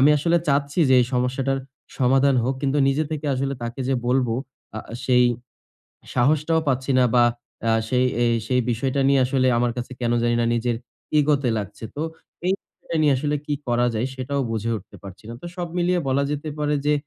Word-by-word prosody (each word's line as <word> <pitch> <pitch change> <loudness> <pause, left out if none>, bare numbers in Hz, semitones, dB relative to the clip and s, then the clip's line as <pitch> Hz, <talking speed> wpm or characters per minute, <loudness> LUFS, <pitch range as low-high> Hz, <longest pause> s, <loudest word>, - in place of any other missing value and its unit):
আমি 145 +3 +6
আসলে 170 +4 +2
চাচ্ছি 140 +3 +1
যে, 130 - +5
এই 120 - +2
সমস্যাটার 130 +2 0 0.4
সমাধান 135 +1 +4
হোক। 130 +2 0
কিন্তু, 140 +1 +1
নিজে 145 +3 +1
থেকে 155 -1 -3
আসলে 135 +1 -1
তাকে 120 +3 -5
যে 135 - +2
বলব 125 -1 +2 0.5
আ - - -2 0.3
সেই 125 -1 +5 0.9
সাহসটাও 155 +5 +2
পাচ্ছি 130 +1 0
না 125 - +5
বা 120 -1 +6 0.4
আ - - +4 0.2
সেই 125 +1 +2 0.2
এই 120 - +3 0.2
সেই 125 -1 +3
বিষয়টা 130 +4 0
নিয়ে 140 -1 +4
আসলে 130 0 +1
আমার 120 0 +1
কাছে 125 +1 -5
কেন 120 -1 +1
জানিনা 120 0 +2
নিজের, 120 0 0 0.4
ইগো 150 0 +4
তে 125 - +1
লাগছে। 105 +2 -7
তো - - -3 0.5
এই 185 - +3
বিষয়টা 165 - -7
নিয়ে 150 -2 +5
আসলে 150 +2 -1
কি 145 - 0
করা 120 0 +2
যায়? 110 +4 0
সেটাও 135 +2 -2
বুঝে 115 0 -2
উঠতে 100 - -12
পারছি 100 +1 -11
না। 115 - -6
তো - - -6
সব 175 -1 -3
মিলিয়ে 175 0 +2
বলা 135 +1 +2
যেতে 150 +1 -3
পারে 150 0 +1
যে, 150 - +4
130 Hz, 195 wpm, -23 LUFS, 120-145 Hz, 0.9 s, আমি